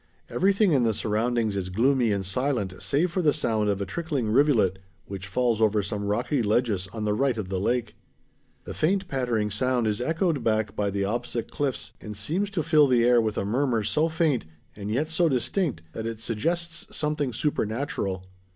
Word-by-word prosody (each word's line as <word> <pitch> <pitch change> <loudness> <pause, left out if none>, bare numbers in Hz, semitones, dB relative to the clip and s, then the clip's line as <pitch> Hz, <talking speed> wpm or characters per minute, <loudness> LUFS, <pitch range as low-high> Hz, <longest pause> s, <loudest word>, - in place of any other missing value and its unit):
Everything 195 0 +3
in 135 -4 +4
the 115 -3 +2
surroundings 110 0 0
is 95 -2 -2
gloomy 120 +4 +2
and 100 -1 -1
silent 115 -2 -1
save 160 +5 +1
for 185 - 0
the 150 -4 +3
sound 110 -8 0
of 100 -1 0
a - - -1
trickling 135 - -2
rivulet 115 -8 +3 0.3
which 95 -1 -7
falls 115 +2 +1
over 105 -1 +3
some 100 +2 -3
rocky 120 +7 0
ledges 105 -3 +1
on 110 -1 -4
the 105 - +1
right 130 +2 +1
of 100 -4 -4
the 95 -1 -1
lake. 120 +2 -1 0.7
The - - -7
faint 190 +4 +1
pattering 120 -7 -1
sound 125 +3 +1
is 105 +1 0
echoed 160 -1 0
back 110 -2 0
by 105 -1 0
the 100 0 -1
opposite 120 +2 -3
cliffs 145 -3 -2
and 105 -2 -7
seems 170 - -1
to 190 -6 -2
fill 155 -2 +5
the 120 -3 +3
air 120 -1 +5
with 110 -2 -2
a - - -1
murmur 120 +1 +1
so 155 +9 +1
faint, 155 - 0 0.3
and 105 0 -6
yet 135 +8 0
so 160 +1 +2
distinct, 130 - -1
that 110 0 -4
it 115 -1 -5
suggests 165 +10 -2
something 150 -3 -1
supernatural. 110 -6 -2
120 Hz, 190 wpm, -26 LUFS, 105-145 Hz, 0.7 s, fill